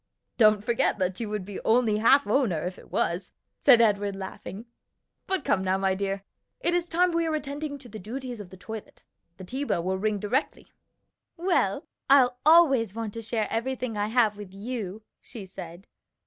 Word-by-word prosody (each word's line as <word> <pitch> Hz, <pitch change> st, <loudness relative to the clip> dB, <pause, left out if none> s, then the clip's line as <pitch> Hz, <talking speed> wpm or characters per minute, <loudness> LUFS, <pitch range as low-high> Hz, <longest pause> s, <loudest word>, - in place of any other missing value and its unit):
"Don't 215 Hz, -2 st, +5 dB
forget 235 Hz, -1 st, +1 dB
that 185 Hz, -1 st, -1 dB
you 225 Hz, -3 st, -3 dB
would 210 Hz, -3 st, -3 dB
be 200 Hz, 0 st, -6 dB
only 225 Hz, -2 st, +3 dB
half 270 Hz, +6 st, +5 dB
owner 205 Hz, -, +1 dB
if 180 Hz, +1 st, -5 dB
it -, -, -16 dB
was," 180 Hz, +2 st, -1 dB, 0.3 s
said 250 Hz, -5 st, +7 dB
Edward 205 Hz, -3 st, +2 dB
laughing. 195 Hz, +2 st, -8 dB, 0.6 s
"But 380 Hz, -1 st, 0 dB
come 190 Hz, -, +2 dB
now, 190 Hz, 0 st, +1 dB
my 190 Hz, 0 st, +1 dB
dear, 195 Hz, 0 st, -3 dB, 0.4 s
it 345 Hz, -, 0 dB
is 350 Hz, 0 st, 0 dB
time 355 Hz, +2 st, +3 dB
we 335 Hz, -1 st, 0 dB
were 310 Hz, -, 0 dB
attending 290 Hz, 0 st, -4 dB
to 265 Hz, -3 st, -12 dB
the 220 Hz, -1 st, -9 dB
duties 245 Hz, +4 st, -6 dB
of 200 Hz, -3 st, -9 dB
the 190 Hz, -, -12 dB
toilet. 220 Hz, +3 st, -9 dB, 0.3 s
The 190 Hz, -, -9 dB
tea 260 Hz, +9 st, -3 dB
bell 170 Hz, -11 st, -1 dB
will 190 Hz, +1 st, -1 dB
ring 215 Hz, +1 st, 0 dB
directly." 210 Hz, +8 st, -2 dB, 0.7 s
"Well, 355 Hz, +2 st, +1 dB, 0.2 s
I'll 250 Hz, -3 st, +5 dB
always 270 Hz, -, +5 dB
want 225 Hz, -2 st, -4 dB
to 230 Hz, -, -6 dB
share 225 Hz, -1 st, -1 dB
everything 250 Hz, 0 st, -2 dB
I 205 Hz, 0 st, 0 dB
have 220 Hz, -2 st, +2 dB
with 200 Hz, -2 st, -10 dB
you," 215 Hz, -1 st, -5 dB, 0.2 s
she 215 Hz, -5 st, -9 dB
said. 175 Hz, 0 st, -10 dB
220 Hz, 190 wpm, -27 LUFS, 195-260 Hz, 0.7 s, said